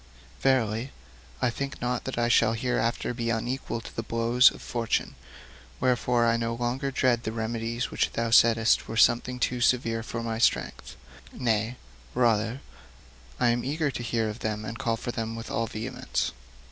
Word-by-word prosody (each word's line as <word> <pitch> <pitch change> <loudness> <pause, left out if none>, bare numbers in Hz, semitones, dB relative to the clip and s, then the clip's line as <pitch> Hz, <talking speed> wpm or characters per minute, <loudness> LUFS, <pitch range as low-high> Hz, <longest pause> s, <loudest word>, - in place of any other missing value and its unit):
Verily, 125 -2 +1 0.5
I 125 - +3
think 140 +3 -5
not 125 0 -2
that 130 - -4
I 120 0 +2
shall 115 -1 +4
hereafter 120 0 -1
be 115 -1 -2
unequal 115 +1 -2
to - - -11
the - - -1
blows 115 +2 +4
of - - -11
Fortune. 115 -1 -2 0.7
Wherefore, 125 -1 +2
I 115 0 +3
no 115 0 -2
longer 125 +4 -1
dread 130 -3 +2
the 110 - -3
remedies 115 +1 -3
which - - 0
thou 115 0 -1
saidst 115 -1 +5
were 115 - -5
something 120 +3 +3
too 125 0 0
severe 115 -2 +2
for 115 +1 -5
my 115 -1 -3
strength; - - 0 0.4
nay, 115 -1 0 0.4
rather, 115 +1 +2 0.8
I 120 - +4
am 120 0 +1
eager 150 +1 -1
to 120 - -5
hear 115 -1 0
of 105 +2 -5
them 110 -1 -3
and 115 +1 -6
call 115 -1 0
for 120 - -4
them 115 -1 -4
with 115 0 -7
all 115 0 0
vehemence.' 125 +4 -3
115 Hz, 170 wpm, -27 LUFS, 115-125 Hz, 0.8 s, saidst